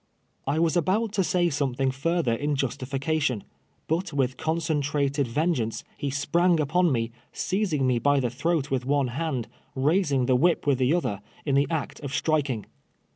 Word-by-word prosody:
'' - - -45
I 140 +3 +1
was 165 0 +2
al)out 195 +6 +1
to 195 -2 +1
say 175 -1 +1
something 135 -2 0
further 150 -1 0
in 145 +5 -1
justification, 135 -1 -1 0.4
but 170 +5 -1
with 130 -2 0
concentrated 145 -4 0
ven 155 +9 +1
geance, 115 -5 -3
he 140 - -3
sprang 165 +5 +2
upon 165 +4 +2
me, 115 -2 0 0.2
seizing 185 -8 0
me 125 -2 +2
by 145 +3 +3
the 125 -3 -1
throat 145 +2 -1
with 130 -2 0
one 140 0 +1
hand, 135 -2 -2 0.3
raising 145 -1 +2
the 130 0 +3
whip 165 +6 +2
with 140 -3 +2
the 130 +1 +3
other, 105 - -2 0.2
in 140 - 0
the 140 +1 +3
act 160 -3 -3
of 140 -2 -5
striking. 140 -8 0
145 Hz, 175 wpm, -26 LUFS, 130-165 Hz, 0.4 s, by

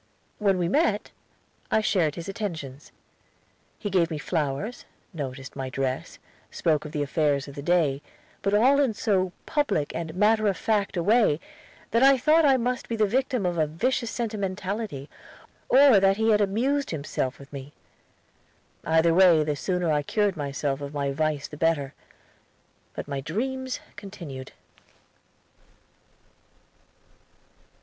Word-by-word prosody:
When 200 -3 +2
we 175 -1 0
met, 295 - +1 0.6
I 220 - +3
shared 175 -8 +1
his 170 +1 -7
attentions. 165 - -6 0.9
He 205 - -4
gave 175 -3 +2
me 160 - -3
flowers; 155 - -3 0.3
noticed 135 -4 -6
my 135 -1 -4
dress; 130 0 -3 0.3
spoke 155 -2 0
of 150 - -7
the 150 -2 -1
affairs 145 -1 0
of 140 - -9
the 140 - -7
day; 150 -4 +1 0.4
but 200 +1 +1
all 260 +6 +5
in 260 -6 +2
so 190 -4 +1
public 225 - 0
and 165 -1 -5
matter 215 +2 +3
of 195 -3 +1
fact 205 -4 0
a 170 - 0
way 210 -7 +3 0.5
that 230 - +3
I 270 0 +7
thought 310 +5 +4
I 270 -2 +5
must 250 +1 -2
be 230 - -1
the 215 -1 +3
victim 250 0 0
of 175 -2 -1
a 155 - +2
vicious 235 - -1
sentimentality, 200 - -3 0.6
or 265 -5 +7
that 195 +1 +3
he 220 0 +3
had 210 -1 +4
amused 255 +8 0
himself 140 -4 -3
with 140 +1 -15
me. 140 0 -8 1.1
Either 160 +1 +3
way, 175 -3 +6
the 150 -1 -1
sooner 180 +2 -1
I 150 -1 +2
cured 205 +5 0
myself 140 -1 -3
of 140 +1 -6
my 140 -1 -1
vice 150 0 -1
the 150 - -10
better. 150 -4 0 1.0
But - - -5
my 140 -2 -3
dreams 260 - -3 0.2
continued. 155 -10 -9
180 Hz, 145 wpm, -26 LUFS, 145-220 Hz, 1.1 s, I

